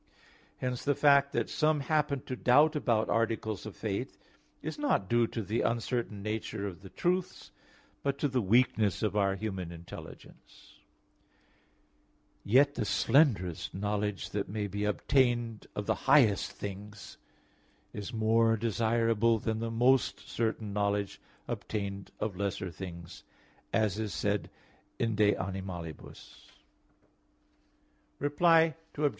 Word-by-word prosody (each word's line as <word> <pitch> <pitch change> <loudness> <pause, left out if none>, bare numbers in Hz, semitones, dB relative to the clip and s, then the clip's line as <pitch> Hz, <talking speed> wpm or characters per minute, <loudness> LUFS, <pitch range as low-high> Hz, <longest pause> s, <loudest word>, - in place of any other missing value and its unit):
i). - - -14
Hence 125 -1 -2
the 145 0 +2
fact 140 -1 +5
that - - 0
some 155 -1 +1
happen 150 -2 0
to 130 -2 -5
doubt 145 +6 +4
about 115 -7 +1
articles 110 -2 -1
of 105 - -8
faith 110 +4 -4 0.5
is - - -5
not 285 - +1
due 120 +1 +3
to 115 - -4
the 110 +4 -1
uncertain 115 -3 -1
nature 110 -1 -3
of 95 -3 -6
the 95 - -11
truths, 180 - -2 0.5
but 140 0 -1
to 145 - +1
the 130 -2 0
weakness 110 -1 +2
of 105 -3 +1 0.2
human 95 -4 -4
intelligence; 85 0 -12 1.6
yet 140 +7 +4
the - - -2
slenderest 95 - +2
knowledge 105 0 -2
that 100 -1 -2
may 105 +1 -2
be 100 +1 -3
obtained 120 0 +1
of 105 - -3
the - - +2 0.2
highest 110 -9 +5
things 100 +1 -8 0.8
is 105 +2 -6
more 115 0 +3
desirable 115 0 +2
than 110 0 -2
the 115 0 -2
most 125 +3 +2
certain 110 -2 -2
knowledge 100 -1 -1 0.3
obtained 100 -2 -4
of 105 -3 -2
lesser 95 -1 -3
things, 85 0 -9 0.5
as 110 -2 +1
is 110 -2 -3
said 100 0 -1 0.5
in 115 -1 0
de 105 0 +3
Animalibus 95 -4 -7
xi. - - -22 1.7
Reply 160 +2 +4 0.2
Obj. 145 0 +3
110 Hz, 130 wpm, -30 LUFS, 100-125 Hz, 1.7 s, fact